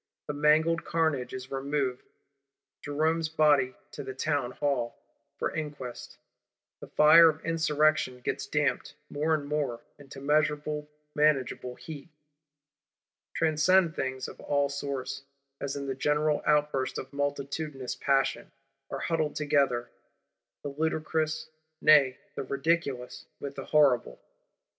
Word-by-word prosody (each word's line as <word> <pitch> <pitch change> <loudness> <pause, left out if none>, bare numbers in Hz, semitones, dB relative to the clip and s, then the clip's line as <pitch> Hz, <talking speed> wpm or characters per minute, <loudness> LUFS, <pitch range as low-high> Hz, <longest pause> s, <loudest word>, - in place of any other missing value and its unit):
The 150 - -4
mangled 155 +3 +3
carnage 155 -7 0
is 130 0 -7
removed; 135 -1 -1 0.8
Jerome's 155 +2 0
body 145 -5 +3 0.2
to - - -7
the 130 - -7
Townhall, 135 -3 -1 0.4
for - - -1
inquest: 145 -6 -6 0.6
the - - -10
fire 165 +2 +7
of 155 0 -5
Insurrection 155 -5 +2
gets - - -3
damped, 150 -1 -1 0.2
more 155 +2 +1
and 145 -2 -4
more, 145 -5 -2 0.2
into 140 -1 -11
measurable, 150 +1 0 0.2
manageable 135 -4 +1
heat. 155 -1 -9 1.3
Transcendent 165 +2 +3
things 130 0 -3
of - - -11
all 145 -1 +1
sorts, 140 -1 -4 0.4
as 140 -1 -3
in 140 -1 -4
the 135 - -2
general 150 +2 +1
outburst 150 -3 +1
of 130 +1 -7
multitudinous 140 -1 -3
Passion, 135 -1 0 0.4
are - - -4
huddled 160 -3 -1
together; 140 -5 +1 0.7
the 145 - -3
ludicrous, 155 +1 -1 0.3
nay 140 -4 +6 0.2
the - - -4
ridiculous, 140 -2 -1
with 140 -1 -6
the 135 -1 -7
horrible. 130 - +3
145 Hz, 120 wpm, -29 LUFS, 135-155 Hz, 1.3 s, fire